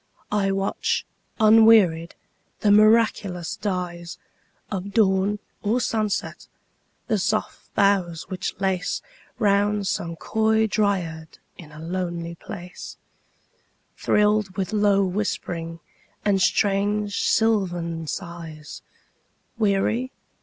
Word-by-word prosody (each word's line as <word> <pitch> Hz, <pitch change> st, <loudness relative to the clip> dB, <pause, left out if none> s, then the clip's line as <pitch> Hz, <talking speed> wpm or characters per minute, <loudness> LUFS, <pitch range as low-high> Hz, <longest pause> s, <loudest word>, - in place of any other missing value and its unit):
I 200 Hz, -2 st, +1 dB
watch, 195 Hz, 0 st, -1 dB, 0.3 s
unwearied, 215 Hz, -7 st, +5 dB, 0.5 s
the 205 Hz, -, +4 dB
miraculous 210 Hz, -4 st, +3 dB
dyesOf 180 Hz, +1 st, -6 dB
dawn 200 Hz, -1 st, +2 dB, 0.2 s
or 220 Hz, +4 st, +1 dB
sunset; 215 Hz, -4 st, -2 dB, 0.6 s
the 215 Hz, -, 0 dB
soft 215 Hz, +3 st, -2 dB
boughs 190 Hz, -5 st, +1 dB
which 185 Hz, 0 st, -4 dB
laceRound 200 Hz, -, -1 dB
some 170 Hz, -3 st, -2 dB
coy 220 Hz, +5 st, +1 dB
dryad 185 Hz, -7 st, -1 dB, 0.2 s
in 155 Hz, -3 st, -13 dB
a 155 Hz, -, -12 dB
lonely 170 Hz, 0 st, -4 dB
place, 180 Hz, 0 st, -9 dB, 1.0 s
Thrilled 210 Hz, -2 st, +1 dB
with 190 Hz, +1 st, -2 dB
low 205 Hz, -2 st, +3 dB
whispering 175 Hz, -4 st, -3 dB, 0.5 s
and 195 Hz, -2 st, +2 dB
strange 205 Hz, +1 st, +1 dB
sylvan 175 Hz, -7 st, 0 dB
sighs:Weary? 195 Hz, -, -4 dB
195 Hz, 85 wpm, -24 LUFS, 175-210 Hz, 1.0 s, unwearied